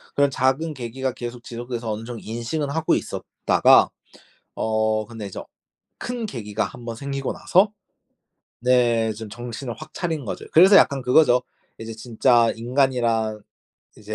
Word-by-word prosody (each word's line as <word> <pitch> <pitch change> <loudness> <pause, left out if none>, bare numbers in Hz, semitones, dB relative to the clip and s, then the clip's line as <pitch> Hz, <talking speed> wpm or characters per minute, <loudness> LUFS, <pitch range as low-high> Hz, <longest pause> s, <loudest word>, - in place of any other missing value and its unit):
그런 140 0 +4
작은 135 +5 0
계기가 130 +1 -4
계속 120 0 -7
지속돼서 120 -1 -5
어느 105 +1 -4
정도 120 -1 -7
인식은 120 +7 -3
하고 160 +2 +1
있었다가 - - +3 0.7
어 110 0 0
근데 110 -2 -8
이제 95 - -7 0.6
큰 245 -2 -4
계기가 105 - -3
한번 120 -2 -7
생기고 135 +1 -3
나서 195 +4 +2 0.9
네. 120 -2 +2
좀 110 0 -8
정신을 120 +2 -6
확 - - -11
차린 160 -6 -3
거죠. - - -5
그래서 190 +5 +8
약간 140 -6 +4
그거죠. 125 0 +4 0.4
이제 115 0 -7
진짜 115 +1 +2
인간이란 115 -3 0 0.6
이제 110 0 -7
120 Hz, 295 characters per minute, -23 LUFS, 115-135 Hz, 0.9 s, 그래서